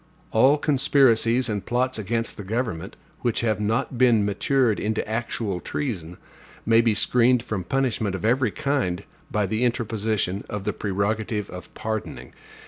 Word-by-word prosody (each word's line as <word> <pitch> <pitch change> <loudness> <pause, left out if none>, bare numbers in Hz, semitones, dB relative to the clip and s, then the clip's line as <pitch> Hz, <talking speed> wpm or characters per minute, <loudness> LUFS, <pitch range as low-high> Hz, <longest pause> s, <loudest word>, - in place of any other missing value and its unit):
All 130 +6 +5
conspiracies 130 -4 +3
and 105 -3 -2
plots 125 0 0
against 115 +3 -2
the 105 - -7
government, 100 -3 -3 0.2
which 120 -3 0
have 110 -2 0
not 115 +4 -1
been 120 -5 +5
matured 115 +3 +1
into 110 +1 -1
actual 110 -3 -2
treason, 90 - -4 0.5
may 115 +1 +5
be 115 -2 +2
screened 125 +1 +3
from 110 -6 -3
punishment 115 -3 0
of 95 - -4
every 125 +1 +3
kind, 105 -11 -1 0.3
by 105 -1 0
the 110 +5 -1
interposition 110 -5 -1
of 105 -2 -4
the - - -1
prerogative 105 +1 -2
of 90 0 -9
pardoning. 110 -1 -5
110 Hz, 145 wpm, -24 LUFS, 105-125 Hz, 0.5 s, All